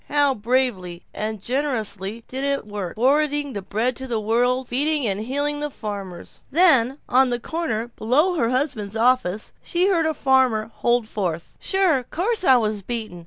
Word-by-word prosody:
How 290 -2 +3
bravely 215 -7 -1
and 215 0 -4
generously 225 -5 -2
it 230 - -19
did 265 +1 -4
its 280 0 0
work, 205 -4 -5
forwarding 290 +3 +1
the 200 - -4
bread 230 +6 -2
of 265 - -6
the 230 -2 0
world, 245 +4 +1
feeding 290 +2 +1
and 200 -2 -1
healing 285 +6 -1
the 295 0 -2
farmers! 200 -8 -7
Then, 275 -6 +4
on 260 +1 +4
the 240 0 -1
corner 240 -6 -3
below 270 +11 +1
her 235 -9 0
husband's 250 -6 -2
office, 225 -4 +1
she 360 +2 +1
heard 335 -4 +2
a 315 - -1
farmer 255 -6 +2
holding 240 -1 +1
forth: 180 -7 -4
"Sure. 375 -8 +2
Course 375 - -1
I 260 -7 +6
was 215 -3 -1
beaten. 220 -4 -5
250 Hz, 170 wpm, -22 LUFS, 215-285 Hz, -, I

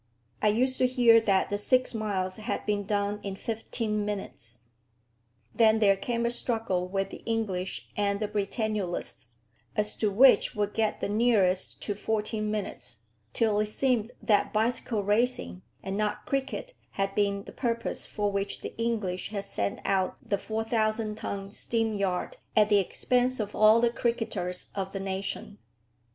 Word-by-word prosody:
I - - +3
used 255 +5 +2
to 255 - +4
hear 240 -3 +6
that 195 -4 +2
the 205 - -1
six 255 +4 +2
miles 195 -4 -2
had 215 - -3
been 205 -1 0
done 205 0 0
in 195 -1 -4
fifteen 220 0 -2
minutes. 125 - -5 0.9
Then 220 -1 +5
there 200 -3 +5
came 235 +4 -2
a 235 - +1
struggle 225 -7 -1
with 195 +1 -2
the - - -9
English 200 -5 -2
and 200 -1 0
the 215 - -1
Britannulists, 200 - -2 0.4
as 210 0 0
to 215 - +1
which 250 +7 +5
would 205 -1 -1
get 220 -1 0
the - - 0
nearest 205 -4 +3
to 205 - -1
fourteen 215 +1 -2
minutes; 195 - -4 0.3
till 215 - +2
it 210 - +1
seemed 240 0 +1
that 210 -3 +3
bicycle 225 -1 +1
racing 205 - +1 0.2
and 195 +1 -3
not 210 0 -1
cricket 275 - -2 0.2
had 195 0 -1
been 200 -1 +1
the - - -10
purpose 235 -2 -2
for 205 -1 -1
which 200 0 -2
the - - -7
English 210 -6 -1
had 205 -2 -3
sent 100 - -2
out 190 -1 +1
the 200 - 0
4000 220 0 -1
ton 200 -2 -5
steam 225 +1 -1
yacht 195 -3 -1 0.2
at 215 -1 +5
the 205 - +5
expense 250 +6 +1
of 210 -1 -3
all 215 +1 +6
the 235 0 +3
cricketers 225 -7 -2
of 195 -1 -4
the 195 - -3
nation. 195 +1 -4
210 Hz, 160 wpm, -28 LUFS, 195-225 Hz, 0.9 s, hear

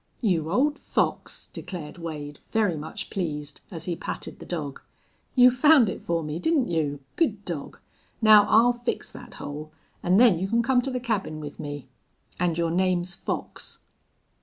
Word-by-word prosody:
"You 170 - +1
old 290 +8 +2
fox," - - -2
declared 175 -2 -7
Wade, 150 -3 -6
very 210 -6 +2
much 155 +7 -7
pleased, 150 -6 -4
as 165 -5 -6
he 175 - -1
patted - - -6
the - - -10
dog. 150 -6 -4 0.5
"You 250 -1 +8
found 260 -2 +6
it - - -7
for 170 -1 -1
me, 150 +2 -4
didn't 300 - +2
you? 150 -4 -1 0.2
Good 215 - +1
dog! 160 -5 -4 0.4
Now 215 -2 +8
I'll 235 +3 +6
fix 240 0 -4
that - - -11
hole, 150 +2 -7 0.3
an' 180 +2 +3
then 225 -7 +6
you 190 - -1
can 230 +3 +2
come 250 +1 +3
to 270 - -2
the 250 - -1
cabin 210 -10 -2
with 150 -1 -8
me. 145 -1 -6 0.5
An' 175 -2 +1
your 165 0 0
name's 185 0 +1
Fox." - - -5
180 Hz, 170 wpm, -26 LUFS, 155-230 Hz, 0.5 s, You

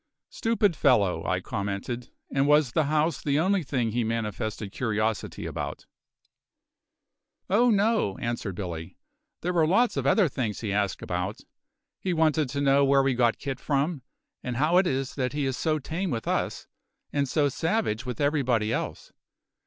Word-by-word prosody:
"Stupid 220 -6 +1
fellow!" 105 -12 +3
I - - 0
commented. 100 +5 -4 0.2
"And 135 +1 +2
was 150 -3 +4
the 155 +2 +2
house 155 +2 +1
the 145 0 +1
only 190 +3 +2
thing 125 -6 -1
he 120 +2 0
manifested 110 -2 -3
curiosity 110 -2 -2
about?" - - -5 1.7
"Oh 240 +5 +5
no," 210 - +2
answered 115 -5 -3
Billy; 85 -3 -6 0.4
"there 180 - -1
were 165 -3 +3
lots 230 +8 +3
of - - 0
other 205 -5 +4
things 120 -7 -3
he 105 -4 -2
asked 100 -2 -1
about. 90 +4 -3 0.6
He 185 - -1
wanted 155 -3 +2
to 140 +2 -2
know 140 0 +4
where 140 0 +4
we 135 -1 +2
got 120 -2 +2
Kit 135 -2 -4
from, 145 +2 0 0.4
and 125 -1 -4
how 155 +6 +3
it 185 0 +4
is 135 -2 -1
that 130 -1 -2
he 145 -1 -1
is 130 -1 -1
so 155 +3 0
tame 165 +6 -3
with 115 -6 -3
us, - - -1 0.5
and 140 -2 0
so 150 0 +2
savage 160 - -1
with 125 -2 -5
everybody 130 -7 +1
else. - - -4
135 Hz, 165 wpm, -27 LUFS, 115-160 Hz, 1.7 s, Oh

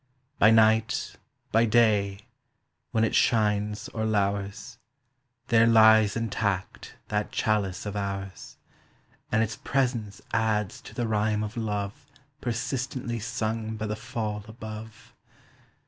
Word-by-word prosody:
By 110 - +7
night, 110 0 +3 0.3
by 115 +1 +4
day, 105 -3 +3 0.7
when 110 - +1
it 115 - +1
shines 105 -2 +1
or 110 - -4
lours, 100 +2 -1 0.7
There 115 -1 +5
lies 110 -2 +6
intact 100 -4 -3
that 105 0 -1
chalice 105 -4 0
of 105 0 -4
ours, 100 -1 -5 0.7
And 110 +1 +3
its 110 - -4
presence 120 -6 -1
adds 110 -3 0
to - - -12
the 120 -2 -1
rhyme 105 0 +1
of 105 +1 -5
love 105 -3 -3 0.3
Persistently 120 0 -3
sung 110 0 -3
by 110 - -3
the 105 0 -2
fall 105 -2 -4
above. 110 +1 -10
110 Hz, 115 wpm, -27 LUFS, 105-115 Hz, 0.7 s, By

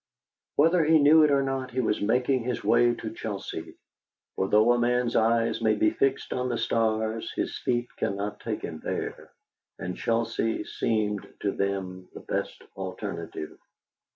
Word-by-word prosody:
Whether 165 +3 +4
he 160 +1 +5
knew 155 +2 +7
it 150 - +5
or 140 -1 +3
not, 135 -1 -2
he 130 +1 -3
was 110 -4 0
making 125 +5 +2
his 125 0 -3
way 120 +1 +4
to 110 -1 -6
Chelsea, 100 -7 -6 0.6
for 95 - 0
though 110 +4 +5
a 120 - +3
man's 120 0 +1
eyes 115 +1 +2
may 110 -1 +3
be 105 0 +3
fixed 135 +4 0
on 125 0 -1
the 120 - -1
stars, 110 0 0
his - - -2
feet 120 0 0
cannot 100 +1 -2
take - - -4
him 80 - -5
there, - - -5 0.5
and 90 0 -4
Chelsea 115 -1 0
seemed 105 -3 -1
to 100 - +1
them 95 -2 -3
the - - -8
best - - -4
alternative. 95 -4 -6
115 Hz, 160 wpm, -27 LUFS, 105-125 Hz, 0.6 s, knew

